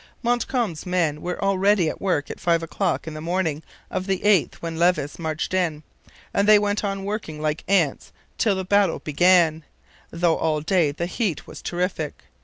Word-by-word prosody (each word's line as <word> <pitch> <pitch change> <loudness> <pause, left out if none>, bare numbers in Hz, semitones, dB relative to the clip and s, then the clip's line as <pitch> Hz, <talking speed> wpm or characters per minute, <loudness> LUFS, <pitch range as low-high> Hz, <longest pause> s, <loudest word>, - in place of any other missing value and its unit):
Montcalm's 240 - -1
men 165 -5 0
were 180 0 -4
already 195 -2 +3
at - - -4
work 180 -7 0
at - - -8
five 170 -1 +1
o'clock 165 - -1
in 160 - -6
the 155 - -7
morning 165 -3 -1 0.3
of 185 - -3
the 190 -1 0
8th 205 -5 +3
when 165 -1 -6
Levis 170 -4 +1
marched 160 +1 -3
in; 165 -5 0 0.5
and 200 +1 +2
they 215 0 +8
went 205 0 0
on 195 -1 -2
working 200 -7 -4
like 155 0 -2
ants 175 -8 +1 0.3
till 210 -4 +3
the 190 0 -3
battle 200 -2 +3
began, 165 0 +3 0.5
though 170 -1 +1
all 155 -2 0
day 165 -2 +2
the 165 +4 -3
heat 185 - -2
was - - -10
terrific. 175 -4 -3
175 Hz, 180 wpm, -23 LUFS, 160-195 Hz, 0.5 s, they